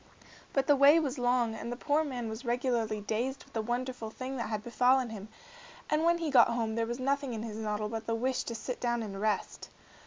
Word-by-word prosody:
But 275 Hz, -1 st, +1 dB
the 290 Hz, -, +5 dB
way 280 Hz, +4 st, +7 dB
was 280 Hz, -4 st, -2 dB
long, 245 Hz, -2 st, +2 dB
and 235 Hz, +1 st, -5 dB
the -, -, -2 dB
poor 295 Hz, +4 st, +1 dB
man 250 Hz, -6 st, -4 dB
was 220 Hz, +3 st, -6 dB
regularly 235 Hz, -3 st, 0 dB
dazed 240 Hz, +6 st, -2 dB
with -, -, -23 dB
the 225 Hz, -, 0 dB
wonderful 240 Hz, 0 st, -3 dB
thing 255 Hz, +4 st, -6 dB
that 235 Hz, -, -3 dB
had 215 Hz, -1 st, -3 dB
befallen 250 Hz, +1 st, +2 dB
him, 210 Hz, -2 st, -7 dB, 0.6 s
and 305 Hz, +1 st, +2 dB
when 340 Hz, +1 st, +4 dB
he 330 Hz, -3 st, -2 dB
got 265 Hz, -, +7 dB
home 230 Hz, -2 st, -1 dB
there 230 Hz, 0 st, 0 dB
was 240 Hz, +2 st, -4 dB
nothing 275 Hz, -1 st, 0 dB
in 220 Hz, -, -4 dB
his 220 Hz, -2 st, -6 dB
noddle 210 Hz, -1 st, -2 dB
but 225 Hz, 0 st, -5 dB
the 230 Hz, -, +1 dB
wish 255 Hz, +3 st, 0 dB
to 230 Hz, -, -4 dB
sit 245 Hz, +3 st, -5 dB
down 240 Hz, -1 st, 0 dB
and 195 Hz, -2 st, -6 dB
rest. 215 Hz, -1 st, -2 dB
240 Hz, 230 wpm, -31 LUFS, 220-265 Hz, 0.6 s, way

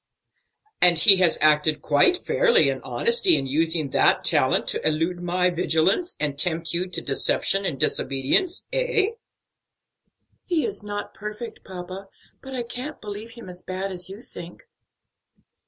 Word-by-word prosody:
"And 175 Hz, -2 st, +6 dB
he 195 Hz, +4 st, +9 dB
has 180 Hz, -3 st, +2 dB
acted 155 Hz, 0 st, +2 dB
quite 150 Hz, -, +3 dB
fairly 475 Hz, +3 st, +2 dB
and -, -, -7 dB
honestly 465 Hz, -6 st, +3 dB
in -, -, -1 dB
using 155 Hz, +1 st, 0 dB
that -, -, +2 dB
talent -, -, +1 dB
to -, -, -4 dB
elude 165 Hz, +3 st, -1 dB
my 180 Hz, +1 st, 0 dB
vigilance 180 Hz, -, 0 dB
and 145 Hz, -2 st, -2 dB
tempt 165 Hz, 0 st, -1 dB
you 180 Hz, +2 st, -2 dB
to 175 Hz, -2 st, -5 dB
deception 195 Hz, +7 st, 0 dB
and 135 Hz, -5 st, -5 dB
disobedience, 135 Hz, -, 0 dB
eh?" -, -, +1 dB, 1.3 s
"He 340 Hz, -4 st, -1 dB
is 410 Hz, -, -4 dB
not 205 Hz, 0 st, -7 dB
perfect, 210 Hz, +3 st, -9 dB
papa, 185 Hz, +1 st, -9 dB, 0.3 s
but 265 Hz, -1 st, -9 dB
I 245 Hz, -, -3 dB
can't 250 Hz, +5 st, -8 dB
believe 215 Hz, +2 st, -9 dB
him 235 Hz, -4 st, -12 dB
as 180 Hz, 0 st, -10 dB
bad 190 Hz, +1 st, -5 dB
as 180 Hz, -1 st, -5 dB
you 200 Hz, +4 st, -10 dB
think." 175 Hz, -, -12 dB
185 Hz, 150 wpm, -23 LUFS, 165-235 Hz, 1.3 s, he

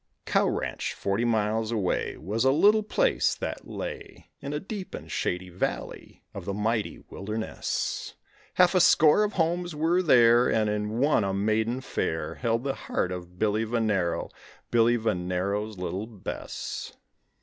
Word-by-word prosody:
Cow -, -, +2 dB
Ranch, -, -, -3 dB
forty 100 Hz, +4 st, -1 dB
miles 110 Hz, 0 st, +1 dB
away, 105 Hz, -6 st, -1 dB
Was 105 Hz, +9 st, -2 dB
a 130 Hz, -, +5 dB
little 205 Hz, +9 st, +5 dB
place -, -, +1 dB
that -, -, -5 dB
lay -, -, -7 dB
In 140 Hz, 0 st, -5 dB
a 150 Hz, -, -2 dB
deep 195 Hz, +1 st, -6 dB
and -, -, -9 dB
shady 90 Hz, +1 st, -2 dB
valley 90 Hz, +1 st, -4 dB
of -, -, -7 dB
the 100 Hz, -, -3 dB
mighty 110 Hz, +1 st, -1 dB
wilderness; 105 Hz, +3 st, -3 dB, 0.4 s
Half 180 Hz, 0 st, +5 dB
a 185 Hz, -, +4 dB
score 160 Hz, +3 st, +6 dB
of 210 Hz, -, -1 dB
homes 175 Hz, 0 st, 0 dB
were 165 Hz, +4 st, +2 dB
there, 120 Hz, -6 st, +5 dB
And 110 Hz, -1 st, +2 dB
in 105 Hz, +1 st, -2 dB
one 140 Hz, -3 st, +3 dB
a 95 Hz, 0 st, -1 dB
maiden 110 Hz, +5 st, 0 dB
fair 80 Hz, -10 st, -2 dB
Held 115 Hz, +4 st, -1 dB
the 135 Hz, -1 st, -1 dB
heart 90 Hz, -, -2 dB
of 90 Hz, -1 st, -7 dB
Billy 110 Hz, +2 st, +1 dB
Venero, 105 Hz, -7 st, 0 dB, 0.4 s
Billy 120 Hz, 0 st, +4 dB
Venero's 100 Hz, 0 st, -1 dB
little 95 Hz, +3 st, -3 dB
Bess. 105 Hz, -5 st, -6 dB
110 Hz, 150 wpm, -27 LUFS, 100-140 Hz, 0.4 s, score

